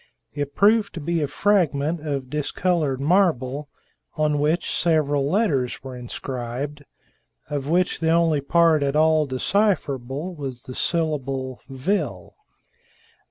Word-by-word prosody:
It 145 -1 -4
proved 205 0 +3
to - - -4
be 165 +2 -1
a 145 - 0
fragment 160 -3 +1
of 140 -4 -3
dis 150 -1 -2
colored 160 -8 0
marble, 145 -4 +1 0.5
on 150 -1 +1
which 155 +4 0
several 145 -4 +1
letters 150 - 0
were 130 -1 -7
inscribed, 125 +3 -5 0.7
of 145 -2 -2
which 180 +2 +1
the 160 - +1
only 165 -3 +3
part 165 +1 +3
at 140 0 0
all 155 -1 +4
decipherable 145 - -1
was 135 -5 -6
the 130 - -8
syllable 135 -6 -2
"Vil." 135 +10 -2
150 Hz, 125 wpm, -23 LUFS, 135-170 Hz, 0.7 s, all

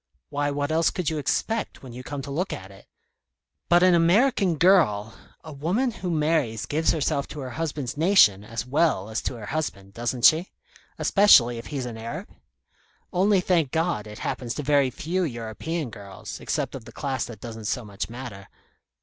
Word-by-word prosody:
Why, 145 0 0
what 145 +1 -2
else 165 +1 +3
could 175 -5 -2
you 155 - -2
expect, 220 +9 -2
when 125 -3 -9
you 125 - -7
come 140 +1 -6
to 140 - -7
look 175 +7 -2
at 95 +1 -7
it?" 95 - -16 0.8
"But 175 +1 +5
an 185 -1 +6
American 185 +2 +3
girl 140 - +4 0.2
" - - -27
"A 155 - -9
woman 185 - 0
who 180 -4 -5
marries 150 -8 0
gives 160 +2 0
herself 140 -3 0
to 150 - -8
her 130 -1 -6
husband's 150 -3 -3
nation 155 - +5
as 115 +2 -5
well 130 - +1
as 110 - -2
to - - -3
her 110 -3 -8
husband, 100 -10 -4
doesn't 120 +2 -1
she 165 +4 +5 0.5
especially 120 - +5
if 115 - -9
he's 140 -4 -4
an 115 -2 -6
Arab? 115 +1 -6 0.8
Only, 195 +1 +3
thank 170 -6 +2
God, 160 -8 -1
it 105 0 -9
happens 120 -2 -3
to 150 - -4
very 140 -2 +3
few 175 +8 -2
European 125 +3 -4
girls, 100 -2 -9
except - - -2
of 130 -4 -8
the - - -11
class 135 -4 -2
that 115 -4 -10
doesn't 110 -1 -8
so 120 +2 -2
much 100 0 -5
matter. 115 -5 -8
140 Hz, 190 wpm, -25 LUFS, 115-165 Hz, 0.8 s, an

